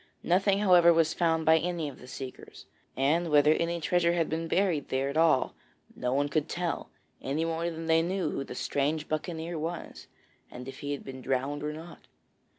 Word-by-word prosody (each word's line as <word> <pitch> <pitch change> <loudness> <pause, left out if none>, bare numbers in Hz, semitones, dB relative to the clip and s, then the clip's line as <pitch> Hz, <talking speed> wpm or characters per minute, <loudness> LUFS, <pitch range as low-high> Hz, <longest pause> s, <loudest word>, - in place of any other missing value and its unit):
Nothing, 195 +3 +3
however, 180 -4 +6
was 165 -1 +3
found 165 -2 +1
by 160 0 +6
any 170 -2 -2
of 140 - -9
the 125 - -12
seekers; 130 0 -9 0.3
and 160 +6 +2
whether 150 0 +5
any 170 +1 -1
treasure 170 +1 +2
had 170 -2 0
been 165 +1 -2
buried 180 -4 +1
there 135 +1 0
at 140 - -5
all, 160 -4 +3 0.4
no 125 - -2
one 140 +2 +1
could 145 +1 -1
tell, 175 -1 -3 0.3
any 145 +5 -1
more 165 +1 -1
than 165 0 -6
they 160 0 +4
knew 185 +3 -1
who - - -3
the - - -8
strange 150 +2 -1
buccaneer 160 +1 -3
was, 165 +2 -6 0.4
and 125 +1 -9
if 135 - -8
he 145 0 -3
had 140 - -6
been 130 -1 -8
drowned 135 +3 -1
or 150 +1 -2
not. 160 +3 -11
160 Hz, 195 wpm, -29 LUFS, 145-170 Hz, 0.4 s, however